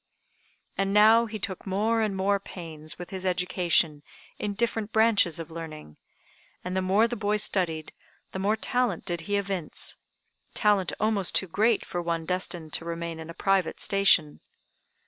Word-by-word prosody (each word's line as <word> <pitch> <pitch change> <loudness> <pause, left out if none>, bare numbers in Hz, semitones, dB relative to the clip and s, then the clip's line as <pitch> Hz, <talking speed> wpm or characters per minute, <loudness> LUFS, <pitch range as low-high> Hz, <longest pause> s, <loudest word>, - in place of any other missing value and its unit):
And 195 +1 +1
now 220 +2 +6
he 215 0 -5
took 195 -1 -5
more 215 +4 +1
and 210 -3 0
more 200 +1 +2
pains 160 -5 -8
with 175 - -9
his 190 -1 -3
education 180 -4 +1 0.4
in 205 -1 -3
different 225 -1 -1
branches 220 -7 +3
of 165 0 -7
learning; 155 - -8 0.7
and 180 +1 -4
the 190 - +1
more 195 +5 +3
the 240 - -4
boy 210 -1 0
studied, 175 -6 0 0.4
the 190 - -5
more 205 +3 +2
talent 220 -1 -1
did 175 -1 -3
he 205 - +1
evince 195 -5 -3 0.6
talent 205 -4 +2
almost 210 -4 +1
too - - +3
great 215 +5 +1
for 175 - -3
one 165 -1 -2
destined 175 -3 -2
to - - -1
remain 170 -1 -5
in 160 0 -8
a 165 - -8
private 195 -3 +1
station. 185 -6 +3
190 Hz, 165 wpm, -27 LUFS, 170-210 Hz, 0.7 s, now